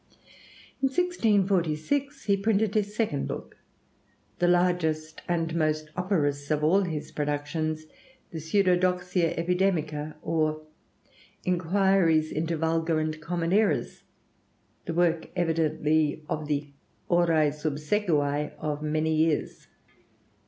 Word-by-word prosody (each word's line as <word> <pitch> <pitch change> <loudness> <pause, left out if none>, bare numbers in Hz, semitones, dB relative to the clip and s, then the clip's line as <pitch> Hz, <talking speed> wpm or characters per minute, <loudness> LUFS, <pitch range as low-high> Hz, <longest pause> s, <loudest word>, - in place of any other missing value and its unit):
In 270 - +4
1646 225 - +1
he 200 - +3
printed 210 +1 +1
his 210 -1 0
second 210 -12 -1
book, - - -7 0.8
the 175 - +3
largest 175 -3 +1
and 165 -2 -1
most 155 -1 0
operose 145 -7 0
of 150 -1 0
all 180 +6 +4
his 155 -4 -5
productions: 150 +2 -2 0.5
the 165 - -5
'Pseudodoxia 180 0 +1
Epidemica, 165 -4 0
or 155 -1 0 0.8
Inquiries 180 -2 +2
into 165 +2 -1
Vulgar 165 0 +1
and 155 0 -3
Common 170 +1 -1
Errors' 210 +1 +1 0.8
the 165 - -3
work 170 -1 +2
evidently 155 -2 +1
of 155 -1 -3
the 145 -1 -2 0.4
horæ 165 -4 +3
subsecivæ 150 -1 0
of 150 -1 -3
many 155 +1 0
years. 155 -1 0
165 Hz, 105 wpm, -27 LUFS, 155-180 Hz, 0.8 s, In